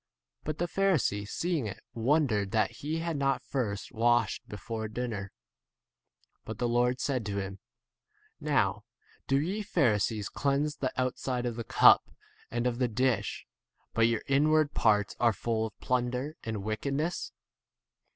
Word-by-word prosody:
But 155 0 -3
the 175 - 0
Pharisee 165 - +1
seeing 165 -9 -1
[it] 95 - -8
wondered 115 -5 +2
that 110 -1 +1
he 155 +3 -3
had 165 -1 -2
not 135 -1 0
first 105 -7 -3
washed 120 -2 +2
39 - - -26
before 110 +2 -4
dinner. 110 -4 -4 1.1
But 110 - -6
the 120 - 0
Lord 125 +1 +2
said 130 -4 -1
to 100 -1 -2
him, 95 0 -5 0.8
Now - - +1 0.4
do 135 0 +3
ye 185 +8 -1
Pharisees 110 - +1
cleanse 145 +2 0
the 130 - -1
outside 125 -1 -1
of 120 -2 -2
the 115 - -4
cup - - +6 0.4
and 120 +1 -2
of 120 -1 0
the 125 - +3
dish, 115 -2 0 0.5
but 115 0 +4
your 115 -2 0
inward 150 +2 +3
[parts] 105 -5 +2
are 120 -2 +4
full 110 +1 -1
of 105 - -16
plunder 125 +4 -1
and 110 -1 -3
40 100 -1 -5
wickedness. 140 +10 -2
120 Hz, 150 wpm, -30 LUFS, 110-140 Hz, 1.1 s, cup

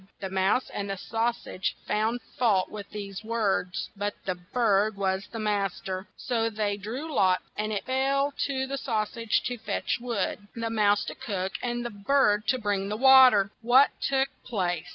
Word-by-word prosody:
The 190 -1 -5
mouse 195 +6 +2
and 200 0 -3
the 195 - -3
sau 225 +4 0
sage 190 -5 -4
found 225 +3 0
fault 210 -7 +2
with 205 -2 -7
these 200 -1 -7
words, 215 -5 -1
but 205 +1 -2
the 185 - 0
bird 205 +2 +1
was 190 0 -1
mas 210 -4 -1
ter. 185 +1 -5
So 230 -2 0
they 210 -2 -1
drew 245 +11 -6
lots, 185 -5 +3
and 215 +1 -2
it 205 - -3
fell 275 +2 +1
to 265 -1 -1
the 275 +1 -4
sau 220 -5 0
sage 230 0 -1
to 245 -1 -3
fetch - - -2
wood, 215 -3 -2
the 230 -1 -3
mouse 210 -2 +3
to - - -5
cook, 190 -3 -3
and 240 -1 -2
the 240 - -3
bird 210 0 +2
to 260 - +3
bring 205 -4 -1
the 210 - -2
wa 265 +1 +9
ter. 200 -3 +1
What 250 +4 +5
took 270 0 +1
place? 180 -7 -2
215 Hz, 185 wpm, -27 LUFS, 195-245 Hz, -, wa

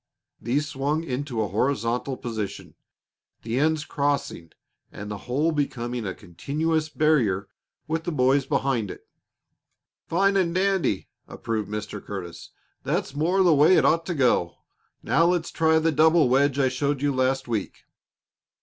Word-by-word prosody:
these 140 +6 0
swung 150 +2 -1
into 130 -5 -3
a - - -2
horizontal 125 +4 -1
position, 110 -4 -5 0.7
the 115 +3 -1
ends 155 0 +1
crossing 140 - -2 0.4
and 105 +1 -8
the 105 - -4
whole 150 +6 +1
becoming 125 -6 -2
a 95 - -4
continuous 155 - -2
barrier 130 -12 +1 0.4
with 160 +1 -2
the 175 - -3
boys 135 -1 +2
behind 125 -7 0
it. - - -10 1.0
"Fine 195 +3 +2
and 175 -3 +1
dandy!" 190 - +1 0.2
approved 110 -3 -4
Mr. 105 0 -5
Curtis. 90 -4 -7 0.3
"That's - - -2
more 175 +6 +2
the 175 -3 +5
way 150 +5 +5
it - - +3
ought 165 +1 +2
to 175 - -2
go. 120 - +2 0.5
Now, 165 - +3
let's 175 -1 0
try 160 -1 +3
the 160 +1 +2
double 160 -1 +4
wedge 140 +1 +2
I 135 -2 +3
showed 140 +2 -1
you 145 -1 +1
last 130 +1 0
week. 110 -4 -4
140 Hz, 150 wpm, -25 LUFS, 120-160 Hz, 1.0 s, the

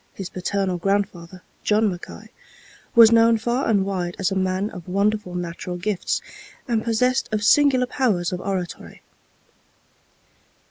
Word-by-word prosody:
His 190 -2 -6
paternal 185 0 -2
grandfather, 185 -2 -2 0.2
John 215 +1 +2
Mackay, 180 -3 -7 0.7
was 230 -1 +8
known 230 0 +5
far 240 +4 -1
and 200 -3 +2
wide 180 -3 -3
as 195 0 -1
a - - -1
man 190 +2 -1
of 180 -2 -10
wonderful 200 0 -1
natural 175 0 -5
gifts, 190 +1 -2 0.4
and 230 -3 0
possessed 250 +3 +1
of 215 0 -1
singular 265 +1 +4
powers 215 -10 0
of 180 - -4
oratory. 185 -3 -5
200 Hz, 135 wpm, -22 LUFS, 180-225 Hz, 0.7 s, was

